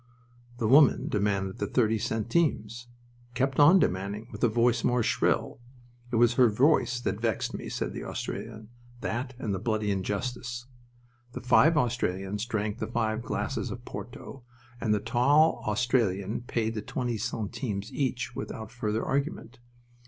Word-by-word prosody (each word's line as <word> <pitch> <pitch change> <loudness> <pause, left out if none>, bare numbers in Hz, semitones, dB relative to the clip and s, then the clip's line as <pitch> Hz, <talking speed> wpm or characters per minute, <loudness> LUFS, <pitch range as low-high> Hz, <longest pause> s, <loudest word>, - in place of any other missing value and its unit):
The 115 - 0
woman 140 +3 +5
demanded 100 -2 -1
the 105 - -1
thirty 110 -1 +2
centimes; 115 0 -1 0.5
kept 135 +2 0
on 155 +6 +8
demanding 100 - -1
with - - -8
a - - +6
voice 120 +1 +2
more 125 -1 +2
shrill. - - 0 0.5
"It - - -1
was 120 +1 +4
her 120 0 +5
voice 125 +2 +3
that 110 -3 -3
vexed 115 -3 -1
me," - - -6
said - - -3
the - - -6
Australian. 110 0 -6 0.3
"That 125 +3 -3
and 110 -5 -3
the 95 - -2
bloody 110 -1 -1
injustice." 120 +5 -3 0.7
The - - -6
five 150 +6 +5
Australians 105 -5 -1
drank 110 -1 -2
the - - -2
five 110 -1 -1
glasses 115 - -3
of 120 - -7
porto, 130 +1 -8 0.4
and 110 - -1
the 105 - +3
tall 145 +9 +3
Australian 110 -3 0
paid 115 -1 -1
the 110 - -3
thirty 120 0 -3
centimes 105 -1 -4
each 125 -3 -2
without 110 -1 -6
further 110 -2 -2
argument. 135 -4 -2
115 Hz, 150 wpm, -28 LUFS, 105-125 Hz, 0.7 s, on